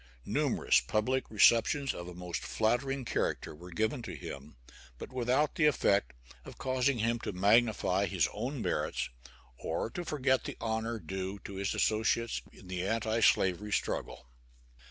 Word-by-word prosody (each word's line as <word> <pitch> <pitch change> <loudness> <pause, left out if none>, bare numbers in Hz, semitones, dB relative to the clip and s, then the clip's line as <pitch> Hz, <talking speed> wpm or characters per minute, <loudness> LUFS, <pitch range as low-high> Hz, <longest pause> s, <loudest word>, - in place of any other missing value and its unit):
Numerous - - +2
public 130 +5 -1
receptions 115 +6 +4
of 85 - -7
a 90 - -8
most 90 -1 -4
flattering 130 +4 0
character - - -1
were 85 +4 -11
given 110 - -1
to 115 - -6
him, 70 +1 -8 0.4
but - - -9
without 130 +4 +1
the 150 - +3
effect 100 - +2 0.3
of - - -11
causing 130 0 +1
him 115 +1 0
to - - -4
magnify 100 0 +3
his 90 -6 +1
own 125 +4 -3
merits - - -1 0.5
or 85 +7 -2
to 175 - -4
forget 130 -5 +1
the - - -5
honor 110 +1 -2
due 95 +1 -5
to 100 - -6
his 100 0 -1
associates 110 +2 +1
in 100 - -15
the 90 -1 -3
anti 110 +2 0
slavery 100 0 +3
struggle. 65 - -2
110 Hz, 155 wpm, -31 LUFS, 95-125 Hz, 0.5 s, receptions